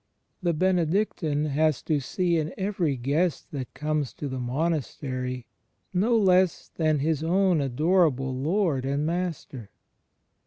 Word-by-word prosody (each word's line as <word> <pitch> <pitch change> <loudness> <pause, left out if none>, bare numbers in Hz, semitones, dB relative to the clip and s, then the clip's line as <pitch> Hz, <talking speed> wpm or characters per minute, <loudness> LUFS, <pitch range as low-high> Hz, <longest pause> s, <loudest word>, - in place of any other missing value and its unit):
The 175 -2 +1
Benedictine 170 -3 +1
has 155 0 +1
to 155 -3 +1
see 170 +6 0
in 155 +3 -3
every 190 -8 -1
guest 145 +7 -1
that 135 -4 -5
comes 150 -3 -1
to 145 - -5
the 130 -1 -4
monastery 130 -2 -2 0.5
no 220 +6 +3
one 210 - +2
less 185 -2 +3
than 155 -2 +1
his 150 +1 0
own 180 -1 +3
adorable 140 -1 +2
Lord 155 0 0
and 140 +2 -1
Master. 165 - -3
155 Hz, 130 wpm, -26 LUFS, 135-180 Hz, 0.5 s, no